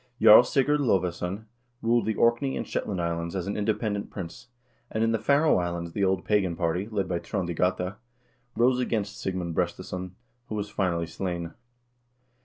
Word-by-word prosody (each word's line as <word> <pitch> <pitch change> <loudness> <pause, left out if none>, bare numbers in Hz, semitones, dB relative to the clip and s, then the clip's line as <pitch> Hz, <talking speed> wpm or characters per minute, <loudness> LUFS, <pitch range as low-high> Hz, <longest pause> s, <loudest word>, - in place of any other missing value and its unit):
Jarl 110 0 +10
Sigurd 145 +4 +2
Lodvesson 95 -3 0 0.4
ruled 115 0 +2
the 110 - 0
Orkney 120 +4 +2
and - - -4
Shetland 95 -3 -2
Islands 85 +1 -2
as 90 -2 -2
an 100 - -3
independent 105 -1 -1
prince, 95 +5 -8 0.4
and 110 - -1
in 115 - +2
the 115 - +1
Faroe 145 -2 +3
Islands 85 -1 -3
the 100 - -1
old 95 -1 +1
pagan 100 -5 +1
party, 90 +3 -1
led 100 -4 -2
by 85 -1 -1
Trond 85 0 -3
i - - -2
Gata, 90 +3 0 0.6
rose 125 +2 +3
against 105 -4 -2
Sigmund 90 -3 -2
Brestesson, 90 +2 -3 0.3
who 110 - -3
was 105 0 -4
finally 85 -4 0
slain. 85 -1 -4
95 Hz, 170 wpm, -27 LUFS, 90-110 Hz, 0.6 s, Jarl